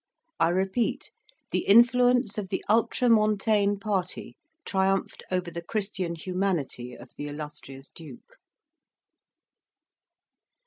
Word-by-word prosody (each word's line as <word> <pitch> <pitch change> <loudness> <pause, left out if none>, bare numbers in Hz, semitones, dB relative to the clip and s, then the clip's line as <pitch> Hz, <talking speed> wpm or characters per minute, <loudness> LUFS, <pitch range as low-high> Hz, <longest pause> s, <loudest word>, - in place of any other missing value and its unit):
I 165 - +4
repeat, 190 +6 -1 0.4
the - - +1
influence 245 +1 +5
of 195 -3 -6
the 190 - -3
ultra 230 +3 +2
montane 215 -2 +3
party 195 -4 -3 0.3
triumphed 195 -1 0
over 180 -2 -2
the 170 - -5
Christian 190 -3 -3
humanity 165 -9 -2
of 120 +2 -14
the 145 - -5
illustrious 145 -2 -9
Duke. 150 -7 -13
190 Hz, 100 wpm, -27 LUFS, 165-215 Hz, 0.4 s, influence